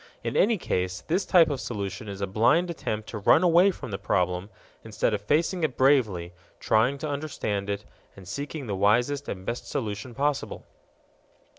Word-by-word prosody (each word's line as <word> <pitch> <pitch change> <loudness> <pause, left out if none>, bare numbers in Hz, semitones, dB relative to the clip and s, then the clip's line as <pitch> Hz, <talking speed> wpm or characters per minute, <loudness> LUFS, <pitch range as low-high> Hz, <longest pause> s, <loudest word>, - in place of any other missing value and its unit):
In - - -3
any 225 +1 +3
case 90 - -2
this 180 +5 -1
type 165 -4 +5
of 135 - -3
solution 105 -1 -5
is 100 0 -7
a - - +1
blind 135 - +2
attempt 110 -9 -4
to 110 - -5
run 160 - +5
away 175 +2 +6
from 130 - -6
the 95 - -4
problem 90 +1 0 0.3
instead 110 0 -1
of 105 - -1
facing 165 - +1
it 150 -5 -1
bravely, 110 -11 +2 0.3
trying 120 +6 +2
to 155 +2 -4
understand 140 -9 -3
it, 100 +1 -3 0.3
and 95 -2 -13
seeking 145 - -5
the 105 -4 -3
wisest 120 +9 +1
and 95 -1 -6
best 120 +3 -4
solution 115 -2 -4
possible. 145 +1 -2
115 Hz, 175 wpm, -26 LUFS, 100-150 Hz, 0.3 s, away